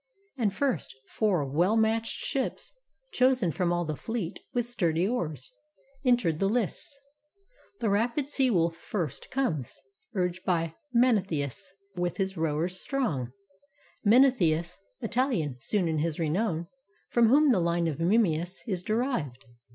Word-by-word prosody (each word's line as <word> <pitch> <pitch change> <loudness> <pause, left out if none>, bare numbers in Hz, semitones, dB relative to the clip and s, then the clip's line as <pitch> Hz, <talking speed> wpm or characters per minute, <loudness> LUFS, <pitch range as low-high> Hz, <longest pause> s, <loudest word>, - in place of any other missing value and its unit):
And 225 -6 +1
first, 230 - -1
four 190 -9 +1
well 175 +10 +2
matched 225 +1 +1
ships 270 -1 -2 0.4
Chosen 255 - +3
from 175 +1 0
all 175 0 0
the 155 -1 -3
fleet, 210 - -4
with 240 -2 0
sturdy 175 -7 0
oars. 155 - -3 0.5
Enter 245 - +3
the 195 +5 0
lists. 245 +5 -2 0.8
The 225 - +1
rapid 240 +7 0
Sea 265 -3 +2
wolf 170 -6 +2
first 170 -3 -4
Comes, 165 - -2 0.4
urged 180 -1 -1
by 165 -3 0 0.2
Mnestheus, 200 - +1 0.2
with 175 -1 -2
his 190 -1 -1
rowers 165 +3 -1
strong; 155 - -1 0.7
Mnestheus, 205 -9 +4 0.2
Italian 210 - 0
soon 185 - 0
in 160 -1 0
his 160 0 -1
renown; 170 +1 0 0.5
From 235 -2 +5
whom 290 +3 +6
the 225 - +3
line 170 0 +1
of 155 -1 -3
Memmius 175 -2 +1
is 190 -7 -1
derived. 215 - -2
185 Hz, 135 wpm, -28 LUFS, 165-235 Hz, 0.8 s, whom